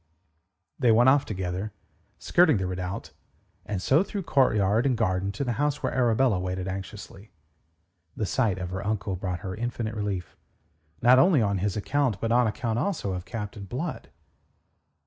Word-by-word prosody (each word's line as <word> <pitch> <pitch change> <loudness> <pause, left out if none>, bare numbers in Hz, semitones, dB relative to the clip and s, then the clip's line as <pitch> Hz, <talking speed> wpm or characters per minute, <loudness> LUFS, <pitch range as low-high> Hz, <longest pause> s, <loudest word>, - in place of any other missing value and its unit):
They 125 -4 +4
went 120 +3 +6
off 140 +1 +4
together, 95 +1 -4 0.4
skirting 165 -8 +4
the 95 - -2
redoubt, 90 -3 -4 0.6
and 105 -3 -2
so 135 - +3
through 200 0 -4
courtyard 110 - +2
and 125 -3 +1
garden 95 -2 0
to 100 - -3
the 125 - -1
house 145 -1 0
where - - -1
Arabella 120 -4 +2
waited 90 0 -3
anxiously. 100 +2 -7 0.9
The 110 - -1
sight 105 -2 +1
of 90 -1 -5
her 95 +1 -4
uncle 105 -2 -2
brought 90 -1 -4
her 95 -2 -5
infinite 115 0 -3
relief, 100 -5 -4 0.7
not 125 +2 +7
only 175 -1 +5
on 100 -2 0
his 100 +2 -1
own - - -1
account, 130 -5 0
but 115 +2 -1
on 120 0 +4
account 110 +1 -2
also 160 - -1
of 90 0 -5
Captain 105 +1 -6
Blood. 140 - -5
105 Hz, 165 wpm, -26 LUFS, 95-125 Hz, 0.9 s, not